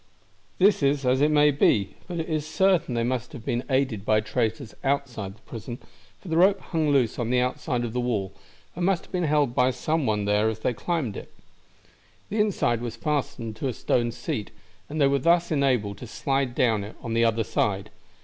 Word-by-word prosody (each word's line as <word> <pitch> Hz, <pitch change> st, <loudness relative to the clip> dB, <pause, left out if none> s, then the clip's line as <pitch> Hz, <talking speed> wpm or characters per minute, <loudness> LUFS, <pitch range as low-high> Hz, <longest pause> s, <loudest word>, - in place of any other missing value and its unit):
"This 195 Hz, 0 st, +4 dB
is 140 Hz, 0 st, +1 dB
as 130 Hz, +2 st, +3 dB
it 150 Hz, -, +4 dB
may 150 Hz, -1 st, +5 dB
be, 105 Hz, -8 st, +2 dB
but 175 Hz, -1 st, -4 dB
it 160 Hz, -, -3 dB
is 155 Hz, -2 st, -1 dB
certain 175 Hz, -5 st, +2 dB
they 115 Hz, -, +1 dB
must 125 Hz, +2 st, -2 dB
have 120 Hz, -5 st, -9 dB
been 120 Hz, +1 st, -1 dB
aided 130 Hz, -6 st, 0 dB
by 110 Hz, 0 st, +3 dB
traitors 110 Hz, +1 st, -2 dB
outside 125 Hz, -8 st, -2 dB
the 110 Hz, -, -25 dB
prison, 120 Hz, -1 st, -7 dB, 0.4 s
for -, -, -14 dB
the 160 Hz, -1 st, 0 dB
rope 195 Hz, +3 st, +5 dB
hung 160 Hz, -3 st, -1 dB
loose 130 Hz, -6 st, +2 dB
on 120 Hz, -1 st, -1 dB
the 125 Hz, 0 st, +3 dB
outside 125 Hz, -1 st, -1 dB
of 115 Hz, -, -5 dB
the 125 Hz, -, -1 dB
wall, 110 Hz, -6 st, -1 dB, 0.4 s
and 175 Hz, -, -3 dB
must 185 Hz, -1 st, +2 dB
have -, -, -23 dB
been 180 Hz, -2 st, 0 dB
held 145 Hz, -4 st, +2 dB
by 125 Hz, +1 st, +3 dB
some 155 Hz, +2 st, -1 dB
one 105 Hz, -2 st, 0 dB
there 105 Hz, +2 st, +2 dB
as 110 Hz, -, -3 dB
they 125 Hz, -, 0 dB
climbed 135 Hz, -, -2 dB
it. -, -, -9 dB, 1.0 s
The 215 Hz, -, -2 dB
inside 190 Hz, -, +1 dB
end -, -, -10 dB
was 120 Hz, -1 st, -4 dB
fastened 140 Hz, -4 st, -2 dB
to 135 Hz, -, -2 dB
a 130 Hz, -, -2 dB
stone 120 Hz, +1 st, 0 dB
seat, 110 Hz, -2 st, -4 dB, 0.4 s
and 155 Hz, +2 st, -4 dB
they 140 Hz, -, +5 dB
were 140 Hz, 0 st, +3 dB
thus 170 Hz, +4 st, +3 dB
enabled 125 Hz, -9 st, +1 dB
to 125 Hz, -, -8 dB
slide 135 Hz, +1 st, -1 dB
down 110 Hz, -5 st, +2 dB
it 105 Hz, -, -9 dB
on 115 Hz, -, -3 dB
the 115 Hz, 0 st, +3 dB
other 115 Hz, 0 st, +2 dB
side. 105 Hz, 0 st, -1 dB
125 Hz, 215 wpm, -25 LUFS, 115-150 Hz, 1.0 s, may